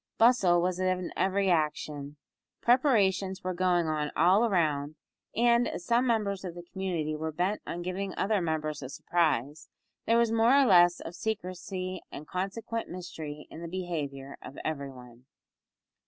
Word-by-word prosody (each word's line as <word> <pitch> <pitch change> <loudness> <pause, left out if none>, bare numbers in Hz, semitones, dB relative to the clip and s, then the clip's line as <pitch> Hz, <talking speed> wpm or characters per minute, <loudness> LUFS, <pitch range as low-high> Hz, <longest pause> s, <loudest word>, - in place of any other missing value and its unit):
Bustle 225 -7 +5
was 180 0 0
in 185 -1 -1
every 195 0 +2
action. 150 -2 -1 0.4
Preparations 200 -7 +2
were 185 0 -1
going 175 -1 +2
on 155 -1 -1
all 190 +8 +4
round, 155 -5 0 0.4
and, 235 +1 +4
as 175 - -5
some 240 +2 +2
members 205 -5 0
of 175 -3 -6
the 175 - -8
community 175 -4 -3
were 160 +1 -3
bent 180 +6 -1
on 175 +1 -4
giving 190 +2 -3
other 205 0 +1
members 155 -2 -2
a 130 - -6
surprise, 150 -2 -1 0.4
there 230 - +4
was 235 -1 +3
more 230 +4 +5
or 275 - +5
less 175 -5 +5
of 165 - -7
secrecy 185 -3 -4
and 150 - -8
consequent 210 +5 -3
mystery 160 -4 -7
in 165 - -9
the 170 - -5
behaviour 150 -7 -4
of - - -10
every 140 -3 -3
one. 125 -1 -14
180 Hz, 155 wpm, -29 LUFS, 155-200 Hz, 0.4 s, Bustle